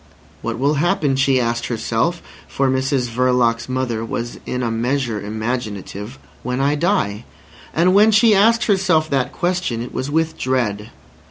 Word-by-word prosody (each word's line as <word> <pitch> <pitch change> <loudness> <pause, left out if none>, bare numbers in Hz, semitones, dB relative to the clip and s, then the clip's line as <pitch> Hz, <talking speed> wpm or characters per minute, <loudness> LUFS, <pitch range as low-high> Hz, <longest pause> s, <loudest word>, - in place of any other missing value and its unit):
What 115 0 -3
will 140 +4 +2
happen, 160 -6 +1
she 135 -1 +3
asked 120 0 -1
herself 120 +8 -1 0.2
(for 135 -1 0
Mrs 130 -1 0
Verloc's 120 -1 +1
mother 130 -3 -2
was 115 +1 -5
in 125 0 -2
a 115 - -1
measure 120 -1 -1
imaginative), 110 0 -5 0.2
when 125 +1 -3
I 140 +2 +2
die? 145 - 0 0.5
And 175 +3 +3
when 210 +3 +6
she 215 +1 +5
asked 225 +3 +4
herself 185 -6 +2
that 135 -2 0
question 175 -9 -1
it 120 +1 -6
was 130 +2 -3
with 160 +1 -1
dread. 115 -5 -1
130 Hz, 155 wpm, -20 LUFS, 115-160 Hz, 0.5 s, when